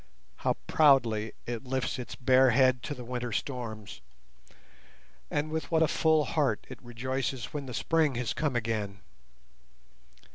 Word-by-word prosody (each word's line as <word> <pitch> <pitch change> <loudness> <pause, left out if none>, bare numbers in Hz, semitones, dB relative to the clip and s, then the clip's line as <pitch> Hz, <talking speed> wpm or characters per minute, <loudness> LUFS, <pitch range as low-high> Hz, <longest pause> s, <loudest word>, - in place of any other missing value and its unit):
How - - 0
proudly 120 -8 +3
it 120 0 -4
lifts 130 0 -2
its 125 - -6
bare 130 0 +5
head 130 0 +4
to 145 - -5
the 125 - -8
winter 125 0 -4
storms, 110 -4 -5 1.3
and 150 +1 -1
with 160 0 -3
what 160 -1 +3
a - - +3
full 155 -1 +3
heart 145 -9 0
it - - -10
rejoices 125 +1 -3
when 145 -2 -4
the 125 - -6
spring 160 -5 +2
has 120 -2 -1
come 150 -5 -1
again! 105 -4 -2
130 Hz, 145 wpm, -29 LUFS, 115-145 Hz, 1.3 s, bare